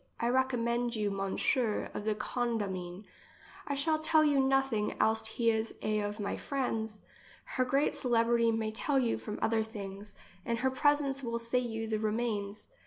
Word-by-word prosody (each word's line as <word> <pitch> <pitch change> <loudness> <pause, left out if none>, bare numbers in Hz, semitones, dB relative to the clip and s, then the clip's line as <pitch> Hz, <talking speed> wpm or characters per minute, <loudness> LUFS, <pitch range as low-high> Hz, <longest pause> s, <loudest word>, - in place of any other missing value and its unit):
I 235 - +1
recommend 245 -2 +1
you 210 -2 0
M. 195 - -4 0.7
of 205 - -5
the 215 -1 +1
Condamine. 205 -6 -2 0.6
I 285 - -1
shall 310 +3 +1
tell 315 0 +4
you 290 -2 +3
nothing, 270 -5 +1
else 220 +1 +3
he 230 +1 +2
is 220 0 -2
a 215 0 +1
of 205 +1 -3
my 200 - -2
friends. 225 -6 -2 0.4
Her 255 - 0
great 275 +3 +1
celebrity 235 -1 +3
may 220 -1 -1
tell 275 +5 0
you 245 -3 +1
from 210 - -5
others 220 0 +1
things, 200 -2 -8 0.3
and 235 +3 -1
her 260 +3 +1
presence 280 0 +2
will 235 -2 -2
say 235 +2 0
you 225 -2 -3
the 220 -1 -1
remains. 215 -2 -2
230 Hz, 170 wpm, -31 LUFS, 215-260 Hz, 0.7 s, tell